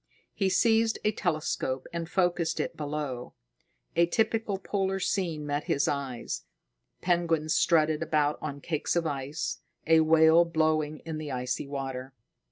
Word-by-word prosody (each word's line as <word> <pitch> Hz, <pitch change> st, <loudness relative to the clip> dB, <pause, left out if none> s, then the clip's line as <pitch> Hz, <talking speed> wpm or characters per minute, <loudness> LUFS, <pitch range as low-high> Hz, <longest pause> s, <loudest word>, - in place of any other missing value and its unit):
He 195 Hz, -2 st, +1 dB
seized 225 Hz, +3 st, +3 dB
a 215 Hz, -, +3 dB
telescope 155 Hz, -8 st, -2 dB
and 170 Hz, -1 st, -4 dB
focused 175 Hz, -3 st, +1 dB
it -, -, -2 dB
below. 145 Hz, -4 st, -4 dB, 0.6 s
A 170 Hz, +1 st, +4 dB
typical 220 Hz, +1 st, 0 dB
polar 195 Hz, 0 st, -1 dB
scene 170 Hz, -6 st, -1 dB
met 145 Hz, 0 st, -2 dB
his 145 Hz, -, +1 dB
eyes: 135 Hz, -4 st, -3 dB, 0.6 s
penguins 165 Hz, -3 st, +1 dB
strutted 155 Hz, -2 st, +3 dB
about 150 Hz, -1 st, +1 dB
on 145 Hz, -2 st, -5 dB
cakes 160 Hz, +1 st, -1 dB
of 170 Hz, -1 st, +1 dB
ice, 145 Hz, 0 st, -3 dB, 0.3 s
a 160 Hz, 0 st, +5 dB
whale 160 Hz, +1 st, +6 dB
blowing 155 Hz, -2 st, 0 dB
in 160 Hz, -1 st, -4 dB
the 150 Hz, -2 st, -5 dB
icy 125 Hz, +2 st, -2 dB
water. 135 Hz, -1 st, -5 dB
155 Hz, 140 wpm, -28 LUFS, 145-175 Hz, 0.6 s, whale